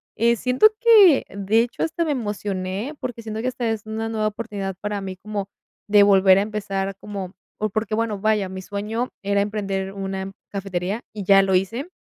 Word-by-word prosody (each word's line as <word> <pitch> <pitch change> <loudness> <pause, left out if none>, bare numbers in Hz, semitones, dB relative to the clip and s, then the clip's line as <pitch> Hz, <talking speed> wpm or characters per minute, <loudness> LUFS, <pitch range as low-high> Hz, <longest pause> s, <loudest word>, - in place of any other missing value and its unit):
Eh, 235 +1 +3
siento 250 - +2
que, 420 - +7
de 200 +3 +1
hecho, 240 +1 -3
hasta 330 +1 -1
me 310 - 0
emocioné, 205 +1 -3
porque 245 -3 -5
siento 220 -1 -5
que 250 - -2
hasta 245 -2 -2
es 220 -1 -3
una 220 +1 -3
nueva 215 -1 0
oportunidad 205 -3 -5
para 205 0 -2
mí 190 -1 -6
como 205 0 -5 0.4
de 205 0 +6
volver 195 -1 +6
a - - +2
empezar, 200 -2 -3
como 195 -3 -6 0.3
o 215 - 0
porque, 215 +1 -2
bueno, 220 -2 -1
vaya, 210 -2 +1
mi 190 0 -7
sueño 215 +5 -3
era 200 0 +1
emprender 195 -2 -2
una 195 -1 -4 0.2
cafetería, 195 +2 -3
y 210 -2 -5
ya 195 +1 +6
lo 190 0 0
hice, 225 - 0
205 Hz, 190 wpm, -23 LUFS, 195-225 Hz, 0.4 s, que